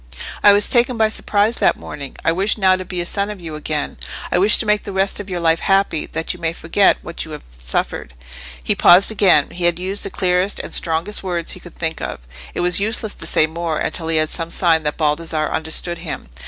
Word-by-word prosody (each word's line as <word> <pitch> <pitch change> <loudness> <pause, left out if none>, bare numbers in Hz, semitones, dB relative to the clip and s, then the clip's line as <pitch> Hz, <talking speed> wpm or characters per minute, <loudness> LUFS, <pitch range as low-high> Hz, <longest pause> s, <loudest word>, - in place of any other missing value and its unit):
"I 205 - +7
was 205 0 +4
taken 245 0 +2
by 220 -1 +3
surprise 215 +1 0
that - - +2
morning. 140 -2 -8
I - - +4
wish 195 +6 0
now 190 -2 +4
to 185 - -5
be 180 -1 -4
a - - -4
son 200 +3 0
to 210 - -5
you 165 -3 -8
again. 150 -1 -4 0.3
I - - +2
wish 205 +3 +5
to - - 0
make 210 0 +2
the 200 - -7
rest 190 0 +1
of 205 -1 -7
your 180 -1 -3
life 165 -1 +2
happy, 195 -5 +1
that 160 +1 -3
you 180 - -12
may 165 -1 -2
forget 180 +4 +2
what 170 - -5
you - - -10
have 150 - -9 0.2
suffered." - - -3 0.5
He - - +1
paused 190 +5 +6
again. 185 -9 +3
He 175 0 -3
had 175 -1 +2
used 190 +3 -2
the - - 0
clearest 185 +1 0
and - - -7
strongest 170 +5 0
words 175 -3 -3
he - - -5
could 175 - -14
think 160 -1 -3
of. - - -5 0.3
It - - -1
was 180 +1 +3
useless 220 +1 -1
to - - -5
say 155 - +3
more, 160 0 -3
until 165 - -2
he 165 -1 +1
had 155 0 +1
some 165 -1 -3
sign 170 -2 +3
that 150 -1 -3
Baldassarre 155 0 -1
understood 160 +2 -1
him. 165 - -6
175 Hz, 235 wpm, -19 LUFS, 160-200 Hz, 0.5 s, I